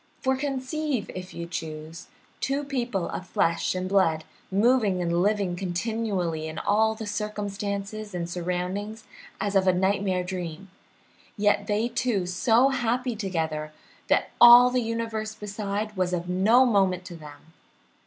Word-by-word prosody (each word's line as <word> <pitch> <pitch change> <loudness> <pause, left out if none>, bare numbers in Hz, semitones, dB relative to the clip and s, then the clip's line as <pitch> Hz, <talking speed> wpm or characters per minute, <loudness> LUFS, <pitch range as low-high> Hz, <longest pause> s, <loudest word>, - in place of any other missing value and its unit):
For 265 -1 +1
conceive, 270 -2 -2
if 185 0 -7
you 170 - -6
choose, 160 -1 -7 0.3
two 275 +2 -1
people 245 -10 -2
of 185 - -6
flesh 170 0 0
and 185 0 -2
blood 175 -5 +2 0.3
moving 210 -2 +3
and 170 0 0
living 200 -2 +1
continually 180 -3 -2
in 155 0 -7
all 220 +4 +2
the 220 0 -6
circumstances 205 0 -4
and 170 -1 -3
surroundings 180 +5 -3 0.4
as 200 0 -2
of 190 -1 +3
a 185 - +5
nightmare 190 0 +1
dream, 180 0 -6 0.7
yet 205 0 +2
they 215 +2 +1
two 235 -5 -1
so 225 +8 +3
happy 245 -1 -1
together 160 -7 -3 0.3
that - - +2
all 240 +1 +10
the 250 0 +1
universe 225 -1 -3
beside 210 0 -4
was 185 -1 0
of 175 0 -2
no 210 +8 +4
moment 190 -5 +2
to 180 -2 -8
them! 155 0 -13
200 Hz, 145 wpm, -26 LUFS, 180-225 Hz, 0.7 s, all